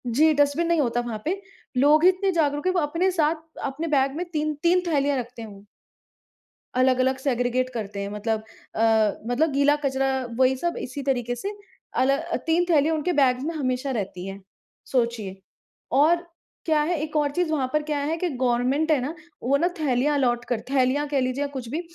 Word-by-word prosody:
जी, 305 +7 +4
dustbin 290 +3 +2
नहीं 340 -1 +2
होता 240 -3 0
वहाँ 230 -3 -5
पे, 380 +5 -1 0.4
लोग 295 +4 +5
ही 365 - +8
इतने 380 +1 +1
जागरूक 295 -1 0
हैं 370 - +2
वो 365 - +2
अपने 335 +5 +1
साथ 320 -3 +2 0.3
अपने 280 +4 -3
बैग 275 -2 +1
में 350 +3 -3
3-3 310 +4 +1
थैलियाँ 285 -3 +1
रखते 245 -1 -6
हैं 225 - -7
वो। 200 0 -14 1.1
अलग-अलग 260 0 +3
सेग्रगेट 255 -1 0
करते 205 -3 -4
हैं 200 - -4
मतलब 220 +1 -2 0.3
अ, - - -1 0.5
मतलब 290 +6 +1
गीला 285 +1 +4
कचरा 270 0 +1 0.3
वही 260 0 +4
सब 345 +5 -2
इसी 260 +3 -5
तरीके 245 -3 -1
से 395 - -4 0.5
अल 275 +1 +3 0.3
3 335 +2 +3
थैली 310 -2 +4
उनके 320 +2 0
बैग्स 260 -4 +3
में 330 +3 -2
हमेशा 255 -2 -1
रहती 190 -3 -4
हैं, 195 +1 -7 0.4
सोचिए 230 -6 -2 0.5
और 335 +6 +3 0.4
क्या 310 -2 +3
है 350 - +1
एक 310 0 -5
और 290 -1 +1
चीज़ 350 +1 -1
वहाँ 275 -5 0
पर 305 0 +1
क्या 300 -1 -2
है 295 +3 -1
कि 355 +1 -1
गवर्नमेंट 260 +3 +1
है 300 - +4
ना, 280 +5 -3 0.3
वो 275 +3 +3
ना 335 +5 +2
थैलियाँ 290 0 +1
अलोट 240 -3 +1
कर 240 -3 0
थैलियाँ 275 +2 +2
कह 280 -2 +1
लीजिए 255 +2 -1
या - - -1
कुछ 255 -4 -6
भी, 310 +7 -2
280 Hz, 195 wpm, -24 LUFS, 250-310 Hz, 1.1 s, ही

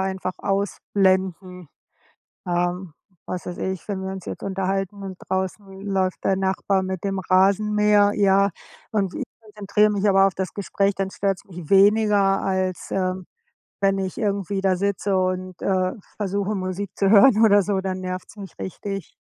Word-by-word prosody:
einfach 190 -1 -2
ausblenden. 190 -3 -1 0.8
Ähm, 175 0 -1 0.3
was 180 - -5
weiß 175 - -6
ich, 190 -2 -4
wenn 195 -2 -2
wir 190 - -4
uns 190 -1 -7
jetzt - - -7
unterhalten 195 +1 -2
und 190 -2 -7
draußen 190 +2 -2 0.2
läuft 190 -2 -1
der 190 - +2
Nachbar 190 0 0
mit 185 -1 -4
dem 195 -1 -1
Rasenmäher, 205 +2 +3
ja, 200 0 +3 0.4
und 195 -4 0
ich - - -3 0.2
konzentriere 210 -1 +1
mich 205 0 0
aber 195 -1 +5
auf 195 - -3
das 190 -1 -4
Gespräch, 200 0 0
dann 195 -1 -2
stört's 195 -2 -2
mich 175 -4 -10
weniger 200 0 +4
als, 185 -1 -2
ähm, 185 -1 -1 0.6
wenn 195 0 +2
ich 190 -1 -4
irgendwie 200 -3 -1
da 190 -1 +2
sitze 200 +1 0
und, 185 -1 -2
äh, 185 -1 +1 0.2
versuche, 200 0 -1
Musik 185 0 -3
zu 195 - +2
hören 215 +2 +6
oder 205 -2 +6
so, 195 0 0
dann 190 -1 -3
nervt's 185 +2 -6
mich 195 -2 -9
richtig. 195 +1 -6
195 Hz, 160 wpm, -23 LUFS, 185-200 Hz, 0.8 s, hören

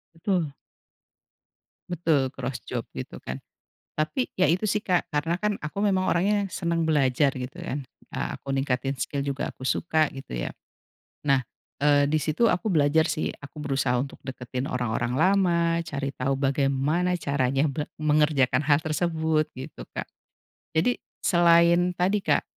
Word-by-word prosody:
Betul. 165 -5 -1 1.4
Betul, 155 -6 +1
cross 130 -2 -4
job - - -2 0.2
gitu - - -6
kan. 65 +1 -5 0.6
Tapi 165 - 0
ya 185 - +3
itu 185 +6 +2
sih 210 +1 +1
Kak, 180 -2 +1
karena 165 +4 0
kan 210 0 +1
aku 150 +5 -6
memang 190 -2 +2
orangnya 200 +2 +2
seneng 170 0 -1
belajar 140 -2 +3
gitu 130 +8 -6
kan, 140 -5 -4 0.3
eee, - - -2
aku 135 - -11
ningkatin 135 0 0
skill 140 +3 -2
juga 140 -1 -3
aku - - -22
suka, 155 +2 +2
gitu 135 - -9
ya. - - -2 0.8
Nah, 135 -3 +4 0.3
eee 145 0 +4
di 155 - +2
situ, 160 +10 +2
aku 180 +3 0
belajar 155 +1 +4
sih 155 - -1
aku 145 +1 -11
berusaha 135 -4 +1
untuk 135 - -5
deketin 130 0 -4
orang-orang 120 -1 -1
lama, 170 0 +3
cari 140 -3 -3
tahu 135 +2 0
bagaimana 140 +6 +1
caranya 140 +1 +1
be 145 +2 -2 0.2
mengerjakan 150 -2 +3
hal 145 0 +4
tersebut 160 -1 0
gitu, 130 +1 -8
Kak. - - -5 0.7
Jadi 240 +10 +2 0.2
selain 170 0 +5
tadi 195 +4 +2
Kak, - - +2
155 Hz, 150 wpm, -26 LUFS, 135-175 Hz, 1.4 s, selain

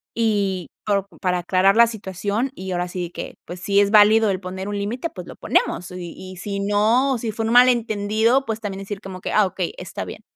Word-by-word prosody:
y 200 -5 0 0.2
po 200 -2 +1 0.2
para 180 -1 +1
aclarar 185 +3 +3
la 235 +1 +8
situación. 210 +2 -3
Y 190 0 -6
ahora 180 0 -1
sí 175 -1 -5
que, - - -7
pues, 180 - -8
si 200 +3 +2
es 200 0 +3
válido 215 0 +6
el 185 - -2
poner 190 +1 -6
un 205 0 -3
límite, 240 +10 -3
pues, 180 -2 -9
lo - - -9
ponemos. 180 - 0
Y 180 -2 -7
y 185 0 -9
si 200 +2 -4
no, 220 +7 +2
si 225 -1 -3
fue 225 +1 -3
un 225 - 0
malentendido, 230 0 +3
pues, 220 -2 -3
también 200 -3 -5
decir 195 +1 -6
como 190 -2 -8
que: - - -4
"Ah, 215 - +5
okey, 185 -2 -3
está - - -6
bien". - - -9
200 Hz, 220 wpm, -22 LUFS, 185-220 Hz, 0.2 s, la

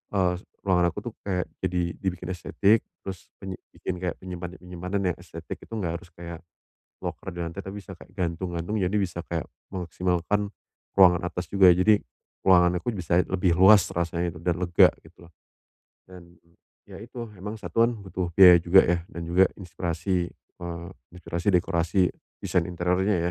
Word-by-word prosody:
eee, 90 -2 +2 0.3
ruangan 90 -2 +3
aku - - -6
tuh, - - -31
kayak 90 -2 0 0.2
jadi, 90 0 0 0.2
dibikin 90 -2 -3
estetik. 100 +5 +2 0.2
Terus, 95 -1 -7
penyim 95 -2 -7 0.2
bikin 90 - -4
kayak 90 -2 -2
penyimpanan-penyimpanan 90 +1 -5
yang - - -8
estetik - - -8
itu - - -12
enggak 85 -6 -2
harus 85 - -16
kayak, 85 -1 -8 0.6
loker - - -5
di - - -8
lantai, 85 +4 -6
tapi 95 +2 -6
bisa 95 - -10
kayak - - -15
gantung-gantung, 85 +1 -3
jadi 95 +2 0
bisa 85 -3 -2 0.5
memaksimalkan 90 +2 -1 0.5
ruangan 90 -2 +7
atas 90 0 -4
juga. 95 -2 +7
Jadi, 100 +4 +4 0.5
ruangan 90 -1 +6
aku 120 - -1
bisa 90 -2 +2
lebih 90 -2 +1
luas 95 +2 +7
rasanya 85 0 -1
dan 85 -1 0
lega 85 -1 +5 0.2
gitu 85 - -17
loh, 85 - -25 0.8
dan, 90 -2 -13 0.6
ya - - -10
itu, 120 +1 -8
emang 100 +3 -6
satuan 115 +2 +2
butuh 95 -3 -4
biaya 90 -2 +10
juga 90 +3 +6
ya, 85 0 +2
dan 85 - -6
juga 90 +3 +5 0.2
inspirasi, 90 0 -2
eee, 85 -1 -9 0.2
inspirasi 90 +1 -4
dekorasi, 90 0 +2 0.3
desain 90 -3 +1
interiornya 90 +3 +1
90 Hz, 155 wpm, -26 LUFS, 85-95 Hz, 0.8 s, biaya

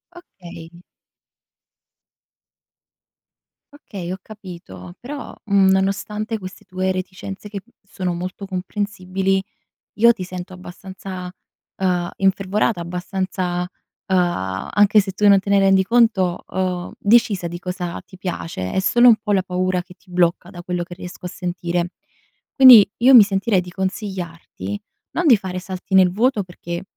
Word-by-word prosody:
Okay. 175 - -13 2.9
Okay, 195 - -8
ho 185 - -4
capito. 175 - -11
Però, 280 +3 -7
mhmm, 200 -2 +4
nonostante 210 +3 0
queste 185 -1 -10
tue 185 0 -2
reticenze 185 +2 -6
che, 200 -1 -6
mhmm, 240 - -29
sono 190 -3 -4
molto 180 +3 -6
comprensibili, 190 0 -2 0.6
io 235 +2 +7
ti 220 -6 -5
sento 180 0 -7
abbastanza, 185 0 -8 0.5
uhm, 180 -2 0
infervorata, 195 +1 +1
abbastanza, 180 0 -3 0.5
uhm 175 - 0 0.2
anche 205 +1 +6
se 195 -1 -5
tu 205 +2 +2
non 200 -1 +7
te 195 - -7
ne 200 - +5
rendi 195 -1 +4
conto 205 -5 +2
uhm, 180 -1 -2
decisa 205 -4 +3
di 175 +1 -7
cosa 180 -1 -5
ti 185 - -15
piace. 165 - -4
È - - +1
solo 240 +6 +4
un 235 - +8
po' 210 -1 -2
la 190 -2 +2
paura 180 0 -1
che 180 - -15
ti 185 - -28
blocca, 175 0 +1
da 175 -3 -10
quello 180 0 -3
che 175 0 -10
riesco 180 0 -10
a - - -7
sentire. 175 -1 -3 0.7
Quindi, 250 -7 +9
io 255 +3 +5
mi 235 -4 +11
sentirei 195 0 +1
di 180 - -10
consigliarti: 180 - -5 0.3
non 350 -1 0
di 240 -7 +7
fare 185 -2 -5
salti 185 +1 -8
nel 185 -2 +6
vuoto 225 +3 +1
perché, 175 -1 -7
185 Hz, 145 wpm, -21 LUFS, 180-200 Hz, 2.9 s, mi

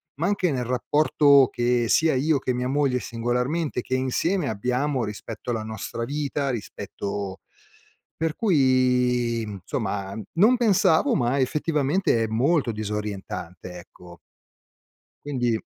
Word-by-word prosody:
ma 165 +5 -1
anche 200 -4 +1
nel 125 -3 -2
rapporto 140 +2 +4
che 120 0 +1
sia 160 0 +3
io 145 +3 +2
che 130 - -1
mia 125 +1 -2
moglie 135 -2 +1
singolarmente 125 +6 -2
che 130 - -2
insieme 145 +6 0
abbiamo 125 +5 -1
rispetto 105 +3 -7
alla 110 -2 -2
nostra 110 +1 -5
vita, 145 0 -2
rispetto 100 -3 -5 0.8
per 160 -1 -1
cui, 125 - +2
mhmm, 100 -3 -7
insomma, 100 -1 -3
uhm, 110 - -6
non 215 +9 +4
pensavo 195 -9 +3
ma 125 +2 +1
effettivamente 150 0 +1
è - - -1
molto 130 +4 +1
disorientante, 100 -4 -5
ecco. 85 0 -15 1.1
Quindi 120 -6 -1
125 Hz, 125 wpm, -24 LUFS, 115-150 Hz, 1.1 s, rapporto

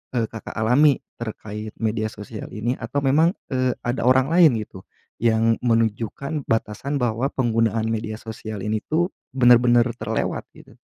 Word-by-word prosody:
e 115 - +2
Kakak 110 -2 -8
alami 125 +6 +4 0.2
terkait 110 -1 -6
media 110 0 0
sosial 105 0 -8
ini? 120 +4 -2
Atau 135 +4 -3
memang, 160 +7 +4 0.2
eee, 130 -1 +1
ada 120 0 -1
orang 130 +2 +4
lain 165 -6 +6
gitu, 95 -2 -11 0.3
yang 115 0 +3
menunjukkan 115 +5 -1
batasan 115 +5 -1
bahwa 120 +2 0
penggunaan 115 -3 +1
media 110 -1 -2
sosial 110 -2 -7
ini 110 +1 0
tuh 175 +4 +1 0.2
benar-benar 120 -1 +5
terlewat, 110 0 -2
gitu? - - -17
115 Hz, 145 wpm, -23 LUFS, 110-130 Hz, 0.3 s, lain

